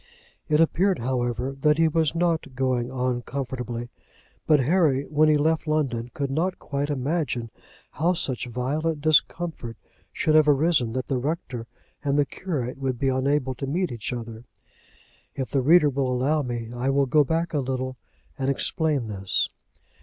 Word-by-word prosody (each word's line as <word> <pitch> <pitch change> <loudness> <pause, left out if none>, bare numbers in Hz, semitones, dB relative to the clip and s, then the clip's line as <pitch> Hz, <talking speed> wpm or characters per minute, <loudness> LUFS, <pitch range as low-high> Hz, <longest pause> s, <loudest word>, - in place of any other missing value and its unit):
It 150 0 +3
appeared, 180 +4 +3
however, 125 +1 -2
that 150 +1 +4
he 165 0 +4
was 160 0 +1
not 165 -5 0
going 130 -2 0
on 125 -1 -1
comfortably; 125 -2 -5 0.6
but 150 -2 +5
Harry, 145 -2 +2
when 155 +1 +3
he 150 - +5
left 160 +2 +1
London, 130 -6 0
could 140 -2 -2
not 175 +6 0
quite 140 0 -3
imagine 135 -4 -1 0.4
how 170 +5 +1
such 125 - -2
violent 145 +6 -1
discomfort 155 -5 +1 0.3
should 155 - +1
have 155 -1 +6
arisen 140 -5 +3
that 130 0 -2
the 130 -3 -1
rector 125 -5 -4 0.4
and 140 -1 +1
the 145 - +4
curate 135 -6 -4
should 130 -2 -1
be 135 +2 +1
unable 130 0 +1
to 135 +2 -5
meet 175 +3 -1
each 115 0 -4
other. 115 -2 -6 0.9
If 130 -2 -4
the 135 - +2
reader 155 +4 +6
will 130 -1 0
allow 140 +5 +1
me, 120 -3 -4
I 125 +2 -1
will 140 0 +3
go 150 +3 +4
back 165 +4 -1
a 150 - +1
little 130 -1 -3 0.4
and 135 0 0
explain 150 -1 0
this. 95 -3 -1
135 Hz, 165 wpm, -25 LUFS, 125-155 Hz, 0.9 s, have